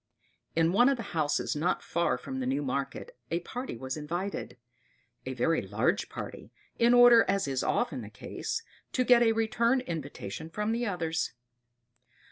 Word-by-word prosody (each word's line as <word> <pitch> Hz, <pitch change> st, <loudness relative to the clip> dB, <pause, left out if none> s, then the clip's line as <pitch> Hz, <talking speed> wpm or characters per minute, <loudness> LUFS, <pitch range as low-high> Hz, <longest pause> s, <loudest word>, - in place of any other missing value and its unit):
In 165 Hz, 0 st, +3 dB
one 240 Hz, +7 st, +5 dB
of 275 Hz, -, +1 dB
the 230 Hz, -, -5 dB
houses 150 Hz, -3 st, 0 dB
not 165 Hz, +5 st, 0 dB
far 170 Hz, 0 st, 0 dB
from 265 Hz, -1 st, -6 dB
the 255 Hz, -, -2 dB
new 255 Hz, -, 0 dB
market 135 Hz, 0 st, -3 dB
a 170 Hz, +1 st, -1 dB
party 245 Hz, -, -6 dB
was 130 Hz, +2 st, -4 dB
invited 170 Hz, +2 st, -4 dB, 0.7 s
a 130 Hz, -, -3 dB
very 165 Hz, +7 st, +2 dB
large 110 Hz, -, 0 dB
party, -, -, -8 dB, 0.3 s
in 235 Hz, +1 st, +5 dB
order, 245 Hz, -1 st, +8 dB
as 195 Hz, -4 st, +1 dB
is 135 Hz, -2 st, -1 dB
often -, -, 0 dB
the -, -, -8 dB
case, 455 Hz, -, -5 dB, 0.3 s
to 255 Hz, -, +2 dB
get 245 Hz, -1 st, +6 dB
a 230 Hz, -1 st, +5 dB
return 230 Hz, +3 st, +2 dB
invitation 155 Hz, -, -6 dB
from 210 Hz, +5 st, -2 dB
the 235 Hz, +1 st, 0 dB
others. 165 Hz, -4 st, -1 dB
175 Hz, 165 wpm, -29 LUFS, 150-235 Hz, 0.7 s, order